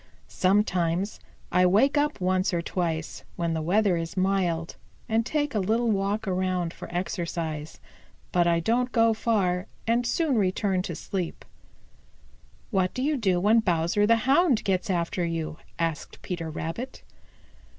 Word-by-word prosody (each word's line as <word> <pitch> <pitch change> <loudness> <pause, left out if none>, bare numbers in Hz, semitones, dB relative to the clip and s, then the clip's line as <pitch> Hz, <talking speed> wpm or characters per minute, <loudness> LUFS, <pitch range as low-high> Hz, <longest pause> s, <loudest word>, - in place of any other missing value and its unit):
Sometimes 185 -1 +1 0.3
I 180 +1 +4
wake 245 +11 +4
up 295 -3 +1
once 185 0 +1
or 170 - 0
twice, 165 -3 -3
when 170 -1 -1
the 160 - -1
weather 190 +2 +2
is 165 +2 -5
mild, 185 -3 0 0.3
and 225 +1 +2
take 290 +3 -1
a 215 - +1
little 225 +4 +1
walk 200 +1 -1
around 185 -2 -1
for - - -9
exercise. 170 -4 -3 0.5
But 175 -1 +3
I 170 -1 +2
don't 245 +7 +1
go 230 -2 +4
far 200 -4 0 0.2
and 235 +1 +1
soon 280 -2 +1
return 190 -1 +1
to 175 -3 -5
sleep." 180 -1 -4 1.3
"What 190 -3 +1
do 255 - -1
you 300 +2 +1
do 190 -8 +1
when 215 +5 +4
Bowser 180 +1 +1
the 230 0 +3
Hound 275 -2 +4
gets 190 +2 0
after 175 0 0
you?" 165 -2 -3 0.2
asked 165 -3 -3
Peter 170 -3 -4
Rabbit. 165 - -5
185 Hz, 150 wpm, -26 LUFS, 170-225 Hz, 1.3 s, I